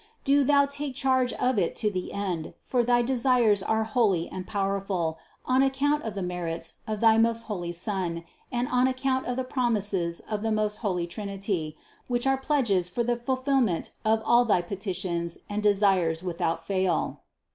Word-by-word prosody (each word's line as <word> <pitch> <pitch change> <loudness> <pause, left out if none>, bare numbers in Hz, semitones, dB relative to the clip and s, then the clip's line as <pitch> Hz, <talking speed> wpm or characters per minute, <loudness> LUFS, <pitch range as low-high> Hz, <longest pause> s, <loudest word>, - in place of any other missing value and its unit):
do 280 +1 +4
Thou 280 +1 +4
take 280 -1 -4
charge 260 -2 +2
of 250 -4 +1
it 170 - 0
to 210 -2 0
the 185 -2 -4
end; 185 -5 -3
for 245 -2 +1
thy 240 0 +3
desires 240 -4 +3
are 220 +3 +1
holy 215 -6 +1
and 185 -1 -7
pow 200 -1 -1
erful 190 -5 -1 0.3
on 255 +1 +3
account 280 +2 +2
of 220 -5 -5
the 195 - -3
merits 175 -2 -4
of 215 -1 -3
thy 225 -1 +6
most 230 0 +2
holy 180 -6 -4
Son 175 -2 -2 0.3
and 245 0 -1
on 250 +1 +3
account 260 0 -1
of 250 - -1
the 260 - -1
promises 205 -9 -1
of 210 -2 -4
the 225 0 -1
most 215 -1 0
holy 180 -6 -1
Trinity, 195 -4 -4 0.3
which 240 0 -1
are 270 0 +4
pledges 240 - +1
for 235 +7 -1
the 240 +1 +1
fulfillment 255 - 0
of 220 0 +2
all 240 +1 +5
thy 200 -7 +2
petitions 180 -3 -3
and 205 +1 -2
desires 195 -5 +2
without 165 -2 -2
fail. 185 -2 0
210 Hz, 180 wpm, -27 LUFS, 185-250 Hz, 0.3 s, thy